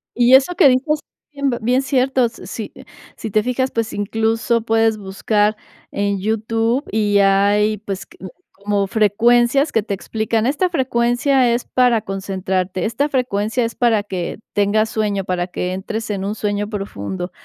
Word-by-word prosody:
Y 245 +1 +4
eso 275 +7 +3
que 335 -6 +6
dices 275 +4 +2 0.3
bien 280 -1 -1
bien 250 +4 +2
cierto, 265 -1 +1
s 230 - -6
si - - -6 0.4
si 220 - -6
te 215 - +3
fijas, 255 +2 -1
pues, 230 -1 -2
incluso 225 +3 0
puedes 225 -1 +2
buscar 205 +2 0 0.4
en 200 -1 -1
YouTube 225 +5 0
y 205 -2 +2
hay, 200 +2 +3
pues, 195 -2 -6
que - - -20
q 190 - -9 0.3
como 205 -1 +1
frecuencias 235 +7 +3
que 225 - +2
te 205 -1 -3
explican, 220 +3 -2
esta 295 +8 +1
frecuencia 255 -2 +2
es 235 +1 -1
para 245 -3 +2
concentrarte, 190 -2 -3
esta 260 +7 -1
frecuencia 245 -3 0
es 230 - -4
para 230 -4 +2
que 185 -4 -4 0.2
tengas 210 +2 +2
sueño, 205 -3 -1
para 180 -1 -2
que 180 0 -3
entres 215 +4 -4
en 195 -2 -3
un 205 +2 -3
sueño 205 -1 -2
profundo. 185 - -5
220 Hz, 160 wpm, -19 LUFS, 200-245 Hz, 0.4 s, que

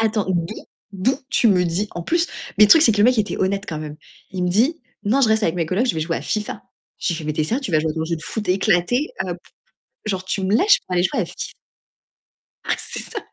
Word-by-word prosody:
Attends, 220 -2 +1
d'où 175 +3 -1 0.4
d'où 230 +8 0
tu 235 - +4
me 180 -3 +4
dis 180 +5 -1
en 175 - -5
plus, 340 - +1 0.3
mais 210 - +9
le 210 - +2
truc, 325 - +8
c'est 225 - +5
que 205 - -3
le 205 - +5
mec 250 0 +4
était 210 -1 0
honnête 195 +2 0
quand 155 -6 -4
même. 150 -1 -7 0.3
Il 185 -1 -2
me - - +1
dit: 245 - +2 0.2
«Non, 235 +7 +2
je 240 - +4
reste 220 0 +3
avec 165 - +1
mes 170 -2 -1
colocs, 190 +10 +1
je 245 - +1
vais 160 - -2
jouer 165 +1 -1
à - - -5
FIFA.» 210 -1 -3 0.4
Je - - -2
lui 170 - +1
fais 155 - -7
«Mais 155 - -1
tu 155 - -2
es - - 0
sérieux, 240 - -1
tu 250 - -4
vas 155 - +4
jouer 160 0 -1
à - - -13
ton 160 - -2
jeu 170 +1 -1
de 160 - -11
foot 215 -4 -5
éclaté, 190 - +2 0.2
heu - - -2
p - - -12 0.7
genre 190 -3 -2
tu 190 +1 -2
me 190 +2 +1
lâches 410 - +5
pour 180 - -3
aller 175 - +3
jouer 180 - 0
à - - -2
FIFA?» - - -10 1.3
Ah - - 0
c'est - - -5
ça, - - -6
195 Hz, 285 wpm, -21 LUFS, 175-225 Hz, 1.3 s, mais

